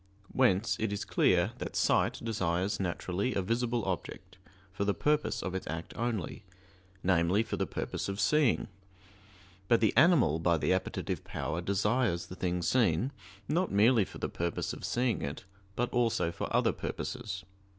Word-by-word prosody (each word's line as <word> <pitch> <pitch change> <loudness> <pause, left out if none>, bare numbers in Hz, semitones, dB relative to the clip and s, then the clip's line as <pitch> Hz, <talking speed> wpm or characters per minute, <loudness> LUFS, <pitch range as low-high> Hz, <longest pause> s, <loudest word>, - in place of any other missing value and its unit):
Whence 115 -4 +2
it 110 -1 0
is 100 0 -3
clear 90 +3 +3
that - - -5
sight - - +2
desires 95 -4 -1
naturally 95 +5 -2
a 100 - +1
visible 115 +2 0
object 95 0 -5 0.3
for 100 - -2
the 100 0 +1
purpose 150 0 0
of 95 - -3
its 95 - -4
act 80 +1 -5
only 115 -5 -3 0.6
namely, 90 +3 +3
for - - -4
the - - -1
purpose - - -4
of 100 +1 -4
seeing; 125 +7 +3 1.0
but 115 +2 +4
the 110 - +2
animal 140 - +5
by 85 0 +2
the 85 - +1
appetitive 95 - -2
power 80 +4 -3
desires 100 0 +1
the 90 - -9
thing 90 -1 -1
seen, 115 - +2 0.4
not 180 +4 0
merely 110 +3 +5
for - - -9
the - - -2
purpose 85 0 -3
of - - -9
seeing 120 -3 0
it, 70 +5 -5 0.3
but 120 +1 -1
also 115 -8 +1
for 85 - -5
other - - +3
purposes. 105 -7 -5
100 Hz, 160 wpm, -31 LUFS, 90-120 Hz, 1.0 s, animal